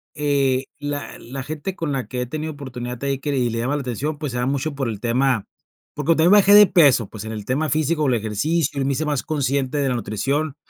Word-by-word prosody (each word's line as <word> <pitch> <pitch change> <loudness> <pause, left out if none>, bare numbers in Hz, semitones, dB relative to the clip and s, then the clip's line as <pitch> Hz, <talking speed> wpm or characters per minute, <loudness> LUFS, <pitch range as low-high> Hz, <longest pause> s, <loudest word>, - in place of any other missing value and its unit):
eh, 140 -3 +1
la 145 0 -5
la 135 +2 -7
gente 155 +5 -5
con 165 -5 -3
la 130 -5 -2
que 125 +2 -4
he - - -1
tenido 155 +4 -4
oportunidad 125 -3 -6
de 140 - -4
ahí, 135 -1 -1
y 135 -5 0
le 115 - -2
llama 130 +5 0
la 145 - -2
atención, 140 +5 -3
pues, 150 -4 -4
se 125 - -3
da 125 - 0
mucho 140 +3 -1
por 135 -3 -2
el 105 -3 -5
tema 120 -1 +1 0.5
porque 150 +3 +2
también 165 +4 +4
bajé 205 0 +7
de 210 0 +10
peso, 140 - +4
pues, 105 0 -8
en 110 - -6
el 105 -2 -6
tema 150 +5 0
físico, 155 +1 +1
el 125 - +3
ejercicio, 140 +7 -1
y - - +1
me 140 +1 0
hice 155 +4 -2
más 145 -3 0
consciente 140 -2 -1
de 140 -2 +1
la 125 - 0
nutrición, 135 +7 -2
140 Hz, 245 wpm, -22 LUFS, 125-150 Hz, 0.5 s, de